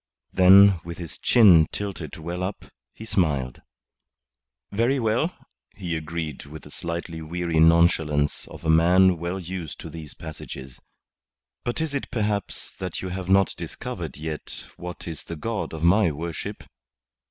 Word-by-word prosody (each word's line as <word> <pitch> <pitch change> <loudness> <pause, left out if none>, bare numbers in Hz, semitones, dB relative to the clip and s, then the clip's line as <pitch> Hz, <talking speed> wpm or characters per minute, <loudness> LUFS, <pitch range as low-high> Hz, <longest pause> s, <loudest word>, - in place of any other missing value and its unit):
Then, 95 0 +7
with 85 0 -7
his 85 -3 -8
chin 90 -10 +6
tilted 95 -7 -5
well 85 +3 -5
up, 95 +2 -4 0.3
he 110 - -10
smiled. 70 - 0 1.1
"Very 120 +6 +2
well," 120 +9 +1 0.4
he 90 -3 -3
agreed 80 -2 -5
with 75 +2 -10
the 75 - -13
slightly 85 -1 -5
weary 85 0 -1
nonchalance 80 -3 +3
of - - -11
a - - 0
man 90 +3 +5
well 85 +3 -3
used 90 -3 -6
to - - -8
these 80 -3 -8
passages. 70 -5 -9 0.8
"But 120 +5 -2
is 160 -3 -2
it 140 - -3
perhaps 105 -3 -2
that 90 -2 -4
you 95 - -3
have 90 0 -5
not 95 0 +4
discovered - - -6
yet 75 0 -5
what 90 0 -8
is 80 -2 -5
the 85 - -6
God 110 +6 -3
of 80 0 -6
my 90 +2 +5
worship? 80 +2 -5
85 Hz, 150 wpm, -25 LUFS, 80-95 Hz, 1.1 s, Then